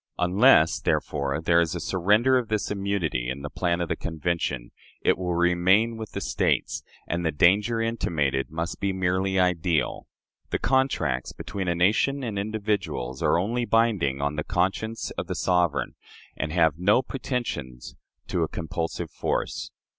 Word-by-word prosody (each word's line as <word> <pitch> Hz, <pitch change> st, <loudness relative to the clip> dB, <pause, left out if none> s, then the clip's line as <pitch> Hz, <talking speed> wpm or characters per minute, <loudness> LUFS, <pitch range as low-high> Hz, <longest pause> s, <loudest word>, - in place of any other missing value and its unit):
Unless, 90 Hz, -2 st, +5 dB
therefore, 70 Hz, 0 st, -1 dB
there 85 Hz, +1 st, +4 dB
is 80 Hz, -2 st, -1 dB
a -, -, -3 dB
surrender 105 Hz, +8 st, +2 dB
of 125 Hz, -3 st, +1 dB
this 105 Hz, -1 st, -1 dB
immunity 95 Hz, -11 st, -1 dB
in 70 Hz, +2 st, -5 dB
the 75 Hz, -, -5 dB
plan 85 Hz, -1 st, 0 dB
of 85 Hz, -, -1 dB
the -, -, -1 dB
Convention, 80 Hz, -6 st, -3 dB, 0.3 s
it -, -, +3 dB
will 90 Hz, -1 st, -2 dB
remain 90 Hz, +6 st, +3 dB
with 110 Hz, -1 st, -8 dB
the -, -, -3 dB
States, -, -, 0 dB, 0.3 s
and 85 Hz, +1 st, -2 dB
the 80 Hz, -, +1 dB
danger 100 Hz, +9 st, +3 dB
intimated 80 Hz, -12 st, -1 dB
must 80 Hz, +2 st, -4 dB
be 100 Hz, -1 st, 0 dB
merely 95 Hz, +1 st, 0 dB
ideal.... 85 Hz, -4 st, 0 dB, 0.4 s
The -, -, 0 dB
contracts 130 Hz, -, 0 dB
between 95 Hz, -2 st, -5 dB
a 85 Hz, -, +1 dB
nation 110 Hz, +10 st, +2 dB
and 110 Hz, -5 st, -3 dB
individuals 100 Hz, -, -2 dB
are -, -, +3 dB
only 115 Hz, +7 st, 0 dB
binding 105 Hz, -, +2 dB
on 75 Hz, +1 st, -1 dB
the 75 Hz, -, -1 dB
conscience 95 Hz, +6 st, -1 dB
of -, -, -4 dB
the -, -, -3 dB
sovereign, 85 Hz, -8 st, +1 dB, 0.4 s
and 75 Hz, -, -3 dB
have 80 Hz, -2 st, +2 dB
no 105 Hz, +8 st, +4 dB
pretensions 75 Hz, -, -4 dB, 0.4 s
to 90 Hz, -, 0 dB
a 80 Hz, -, +1 dB
compulsive 80 Hz, +1 st, -4 dB
force. -, -, -2 dB
90 Hz, 160 wpm, -26 LUFS, 80-105 Hz, 0.4 s, Unless